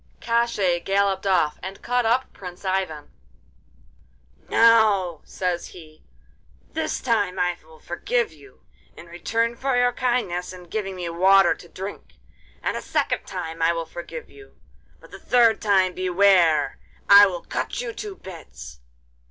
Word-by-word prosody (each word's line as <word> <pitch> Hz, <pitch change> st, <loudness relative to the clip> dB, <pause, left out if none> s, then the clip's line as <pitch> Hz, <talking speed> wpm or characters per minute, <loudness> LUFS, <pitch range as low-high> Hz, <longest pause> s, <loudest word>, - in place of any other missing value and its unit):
Koshchei 220 Hz, -7 st, 0 dB
galloped 195 Hz, 0 st, 0 dB
off 170 Hz, -6 st, +1 dB
and 190 Hz, +1 st, -8 dB
caught 245 Hz, -1 st, +1 dB
up 250 Hz, +3 st, 0 dB
Prince 180 Hz, 0 st, -10 dB
Ivan. 185 Hz, -6 st, -2 dB, 1.4 s
'Now,' 210 Hz, -8 st, +4 dB
says 180 Hz, -2 st, -3 dB
he, 155 Hz, -3 st, -14 dB, 0.7 s
'this 320 Hz, 0 st, -2 dB
time 205 Hz, -6 st, 0 dB
I 180 Hz, -1 st, 0 dB
will 160 Hz, 0 st, -18 dB
forgive 455 Hz, -, -2 dB
you, 405 Hz, -, -19 dB, 0.3 s
in -, -, -11 dB
return 225 Hz, +8 st, -2 dB
for 260 Hz, +1 st, -1 dB
your 245 Hz, 0 st, +3 dB
kindness 235 Hz, -9 st, -1 dB
in 180 Hz, -1 st, -11 dB
giving 195 Hz, +2 st, -4 dB
me 180 Hz, -2 st, -5 dB
water 190 Hz, +2 st, +5 dB
to 175 Hz, -, -15 dB
drink. 195 Hz, +2 st, -8 dB, 0.5 s
And -, -, -1 dB
a -, -, -4 dB
second -, -, -1 dB
time 165 Hz, -3 st, -6 dB
I 165 Hz, +1 st, +3 dB
will 165 Hz, -1 st, -3 dB
forgive 175 Hz, -, -8 dB
you; 410 Hz, -1 st, -17 dB, 0.4 s
but -, -, -18 dB
the -, -, -10 dB
third 235 Hz, -3 st, +3 dB
time 190 Hz, -3 st, +2 dB
beware! 185 Hz, -3 st, +3 dB, 0.3 s
I 200 Hz, 0 st, +9 dB
will 175 Hz, -3 st, -5 dB
cut -, -, -4 dB
you -, -, -4 dB
to 415 Hz, -2 st, -7 dB
bits. 65 Hz, -, -11 dB
190 Hz, 145 wpm, -23 LUFS, 175-230 Hz, 1.4 s, I